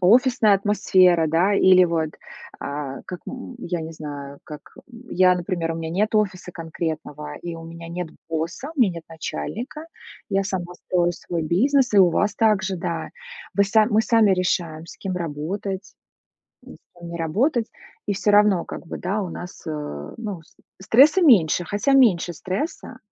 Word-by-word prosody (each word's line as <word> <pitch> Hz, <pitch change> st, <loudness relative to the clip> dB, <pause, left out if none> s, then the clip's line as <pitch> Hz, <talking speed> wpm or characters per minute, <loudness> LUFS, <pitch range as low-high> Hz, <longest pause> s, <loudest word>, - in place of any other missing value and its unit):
офисная 225 Hz, +2 st, +5 dB
атмосфера, 185 Hz, -4 st, +3 dB
да, 175 Hz, +6 st, +2 dB
или 185 Hz, -2 st, +6 dB
вот, 165 Hz, -2 st, -1 dB, 0.5 s
а, 140 Hz, -1 st, -5 dB
как, 180 Hz, -1 st, -7 dB
м, 255 Hz, -1 st, -8 dB
я 175 Hz, -6 st, -3 dB
не 160 Hz, +1 st, -6 dB
знаю, 145 Hz, -2 st, -8 dB
как, 150 Hz, 0 st, -9 dB, 0.3 s
м, 240 Hz, 0 st, -14 dB
я, 185 Hz, 0 st, +4 dB
например, 175 Hz, -2 st, -2 dB
у -, -, -5 dB
меня 165 Hz, -1 st, -4 dB
нет 210 Hz, +6 st, 0 dB
офиса 190 Hz, -4 st, 0 dB
конкретного, 155 Hz, -3 st, -5 dB
и 170 Hz, -1 st, -5 dB
у 165 Hz, -, -10 dB
меня 165 Hz, 0 st, -9 dB
нет 175 Hz, 0 st, -4 dB, 0.2 s
босса, 165 Hz, -, -3 dB
у 270 Hz, -, 0 dB
меня 190 Hz, -7 st, +4 dB
нет 165 Hz, -, -8 dB
начальника, 255 Hz, -, -6 dB, 0.4 s
я 195 Hz, 0 st, +1 dB
сама 180 Hz, -2 st, -4 dB
строю 175 Hz, -1 st, 0 dB
свой 170 Hz, -1 st, -4 dB
бизнес, 250 Hz, -, +2 dB
и -, -, +6 dB
у 180 Hz, -3 st, +7 dB
вас 205 Hz, +5 st, +1 dB
также, 200 Hz, -4 st, +2 dB
да. 170 Hz, -2 st, -3 dB, 0.5 s
Вы 200 Hz, -, +4 dB
сами 215 Hz, +2 st, +3 dB
мы 215 Hz, +1 st, +4 dB
сами 220 Hz, -4 st, +4 dB
решаем, 170 Hz, -3 st, -1 dB
с -, -, -11 dB
кем 185 Hz, -2 st, -4 dB
работать, 180 Hz, +5 st, -4 dB, 0.7 s
с 175 Hz, -, -16 dB
кем 170 Hz, 0 st, -9 dB
не 170 Hz, -, -5 dB
работать. 225 Hz, -, 0 dB, 0.4 s
И 205 Hz, -, +1 dB
всё 205 Hz, +1 st, +1 dB
равно, 205 Hz, -4 st, +4 dB
как -, -, -8 dB
бы, -, -, -5 dB
да, 200 Hz, +4 st, -2 dB
у 180 Hz, -, -5 dB
нас, 180 Hz, +1 st, -9 dB
э, 145 Hz, -, -5 dB
ну, 205 Hz, -7 st, -5 dB
ст -, -, -27 dB, 0.2 s
стресса 285 Hz, -, +5 dB
меньше, 180 Hz, -, +5 dB
хотя 205 Hz, +9 st, 0 dB
меньше 200 Hz, -10 st, +4 dB
стресса 215 Hz, -, -5 dB
180 Hz, 175 wpm, -23 LUFS, 165-210 Hz, 0.7 s, у